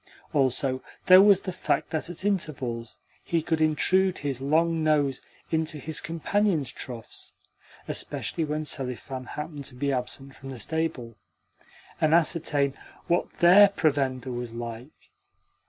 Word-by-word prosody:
Also, 130 Hz, -1 st, +1 dB, 0.2 s
there 185 Hz, +1 st, +9 dB
was 200 Hz, -1 st, +6 dB
the 185 Hz, -, -4 dB
fact 175 Hz, -, -1 dB
that 160 Hz, 0 st, -2 dB
at 175 Hz, +2 st, -7 dB
intervals 135 Hz, -, -2 dB, 0.3 s
he 170 Hz, -, 0 dB
could 160 Hz, -1 st, 0 dB
intrude 185 Hz, +4 st, +3 dB
his 135 Hz, -3 st, -3 dB
long 160 Hz, +3 st, +2 dB
nose 145 Hz, -4 st, +2 dB, 0.3 s
into 160 Hz, -1 st, -1 dB
his 155 Hz, +2 st, -2 dB
companions' 165 Hz, -, 0 dB
troughs 120 Hz, -3 st, -7 dB, 0.5 s
(especially 165 Hz, -, -2 dB
when 155 Hz, 0 st, -2 dB
Selifan 130 Hz, -2 st, -2 dB
happened 150 Hz, -2 st, -6 dB
to 125 Hz, -, -5 dB
be 140 Hz, +2 st, -1 dB
absent 135 Hz, +1 st, -4 dB
from 135 Hz, -, -10 dB
the 130 Hz, -, -7 dB
stable) 125 Hz, -4 st, -3 dB, 0.8 s
and 155 Hz, +1 st, +4 dB
ascertain 155 Hz, -4 st, +2 dB, 0.3 s
what 175 Hz, +1 st, 0 dB
THEIR 185 Hz, +4 st, +7 dB
provender 135 Hz, -5 st, 0 dB
was 120 Hz, -1 st, -5 dB
like. 120 Hz, +3 st, -8 dB
150 Hz, 135 wpm, -26 LUFS, 130-165 Hz, 0.8 s, there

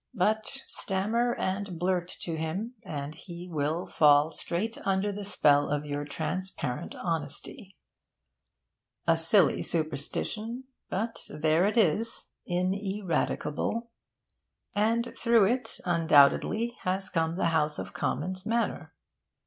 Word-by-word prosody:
But 220 Hz, +7 st, 0 dB
stammer 225 Hz, +5 st, 0 dB
and 190 Hz, -1 st, -2 dB
blurt 180 Hz, 0 st, 0 dB
to 165 Hz, -, -3 dB
him, 170 Hz, +9 st, -3 dB
and 145 Hz, -7 st, -5 dB
he 175 Hz, +2 st, -9 dB
will 160 Hz, +1 st, -1 dB
fall 150 Hz, 0 st, +5 dB
straight 205 Hz, +9 st, -3 dB
under 195 Hz, +1 st, +1 dB
the 205 Hz, +1 st, -5 dB
spell 145 Hz, -7 st, +3 dB
of 145 Hz, 0 st, -1 dB
your 145 Hz, 0 st, -3 dB
transparent 160 Hz, -3 st, -4 dB
honesty. 165 Hz, +3 st, -4 dB, 1.3 s
A 165 Hz, -, +6 dB
silly 165 Hz, +2 st, +4 dB
superstition; 170 Hz, -, -2 dB, 0.3 s
but 225 Hz, +4 st, -2 dB
there 155 Hz, +3 st, +2 dB
it 215 Hz, -, -1 dB
is, 225 Hz, +3 st, +2 dB, 0.2 s
ineradicable; 190 Hz, +3 st, -1 dB, 0.8 s
and 230 Hz, +3 st, +1 dB
through 230 Hz, -3 st, +4 dB
it, 240 Hz, +2 st, -1 dB
undoubtedly, 175 Hz, +7 st, +4 dB
has 190 Hz, +1 st, -1 dB
come 165 Hz, -2 st, 0 dB
the 175 Hz, -, +1 dB
house 150 Hz, -1 st, +1 dB
of -, -, -6 dB
Commons 185 Hz, 0 st, -1 dB
manner. 230 Hz, +2 st, -1 dB
185 Hz, 115 wpm, -29 LUFS, 160-215 Hz, 1.3 s, A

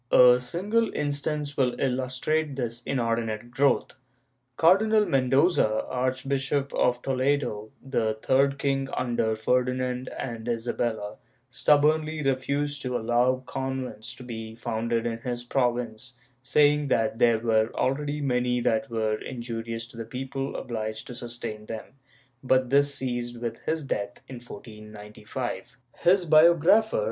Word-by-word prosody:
A 125 Hz, 0 st, +7 dB
single 205 Hz, -, 0 dB
instance 145 Hz, 0 st, -1 dB
will 125 Hz, -2 st, 0 dB
illustrate 135 Hz, +3 st, -1 dB
this 120 Hz, -2 st, -3 dB
inordinate 115 Hz, -2 st, -1 dB
grow^th. 140 Hz, +2 st, +2 dB, 0.7 s
Cardi 185 Hz, +6 st, +5 dB
nal 215 Hz, -1 st, +4 dB
Mendoza, 135 Hz, -, +2 dB
Archbishop 135 Hz, +2 st, -1 dB
of 125 Hz, 0 st, +1 dB
Toledo, 130 Hz, -5 st, 0 dB, 0.2 s
the 110 Hz, -5 st, 0 dB
"third 140 Hz, +1 st, +3 dB
king" 135 Hz, -1 st, -1 dB
under 115 Hz, -3 st, 0 dB
Ferdinand 125 Hz, +2 st, 0 dB
and 115 Hz, -2 st, -5 dB
Isabella, 115 Hz, -2 st, -2 dB, 0.3 s
stubbornly 155 Hz, +3 st, +2 dB
refused 140 Hz, +2 st, 0 dB
to 125 Hz, -1 st, -1 dB
allow 125 Hz, +3 st, +1 dB
convents 130 Hz, -4 st, -4 dB
to 125 Hz, -, -11 dB
be 110 Hz, -2 st, -7 dB
founded 115 Hz, 0 st, -2 dB
in 115 Hz, -1 st, -2 dB
his 120 Hz, 0 st, -4 dB
province, 120 Hz, -1 st, -1 dB, 0.3 s
saying 145 Hz, +2 st, +3 dB
that 115 Hz, -3 st, +1 dB
there 115 Hz, -2 st, +5 dB
were 110 Hz, -1 st, +2 dB
already 145 Hz, +3 st, -1 dB
many 125 Hz, -2 st, +1 dB
that 110 Hz, +3 st, 0 dB
were 110 Hz, -2 st, -1 dB
injurious 115 Hz, -2 st, -5 dB
to 120 Hz, 0 st, -15 dB
the 115 Hz, -, -4 dB
people 135 Hz, +3 st, -5 dB
obliged 110 Hz, -2 st, -4 dB
to -, -, -8 dB
sustain 115 Hz, -3 st, -6 dB
them, 110 Hz, -1 st, -6 dB, 0.6 s
but 130 Hz, -1 st, +2 dB
this 140 Hz, 0 st, +4 dB
ceased 120 Hz, -2 st, -3 dB
with 115 Hz, -1 st, -4 dB
his 160 Hz, -1 st, 0 dB
death 105 Hz, -7 st, -3 dB
in 130 Hz, -, -8 dB
1495. 105 Hz, +1 st, -8 dB, 0.2 s
His 180 Hz, +1 st, +4 dB
biographer. 170 Hz, +7 st, +5 dB
125 Hz, 130 wpm, -26 LUFS, 115-140 Hz, 0.7 s, A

